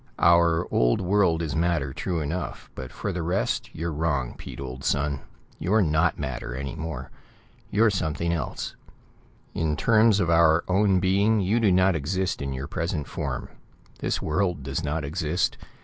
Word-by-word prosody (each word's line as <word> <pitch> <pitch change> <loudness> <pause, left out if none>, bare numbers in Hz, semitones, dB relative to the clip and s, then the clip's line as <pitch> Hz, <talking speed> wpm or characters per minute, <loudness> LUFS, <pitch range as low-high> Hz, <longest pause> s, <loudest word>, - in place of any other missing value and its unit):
"Our 85 0 +4
old - - +3
world 90 -3 +2
is 80 -2 -3
matter, 80 -5 0
true 85 +2 -2
enough, 80 +5 -4
but 65 -2 -7
for 100 - -4
the 90 -2 -3
rest, 90 +4 -1
you're 85 +1 -3
wrong, 75 -5 -1
Pete, - - -9
old 65 -1 -6
son. 70 0 0 0.4
You're 105 +4 +3
not 80 +1 +2
matter, 60 -3 -4
any 70 0 -4
more. 80 -5 -6 0.6
You're 110 +1 +4
something 85 -2 -1
else. 80 - -4 0.8
In 80 -2 -1
terms 110 -2 +4
of 85 - +1
our 85 0 +5
own 95 0 +3
being, 100 +4 +3
you 100 +5 +2
do 110 -4 +3
not 95 0 +4
exist 90 +5 -1
in 70 -1 -3
your 65 +1 -4
present 80 -2 -3
form. - - -4 0.5
This - - -1
world 90 -2 0
does 70 0 -3
not 75 +2 -2
exist. 80 +3 0
85 Hz, 165 wpm, -26 LUFS, 75-95 Hz, 0.8 s, our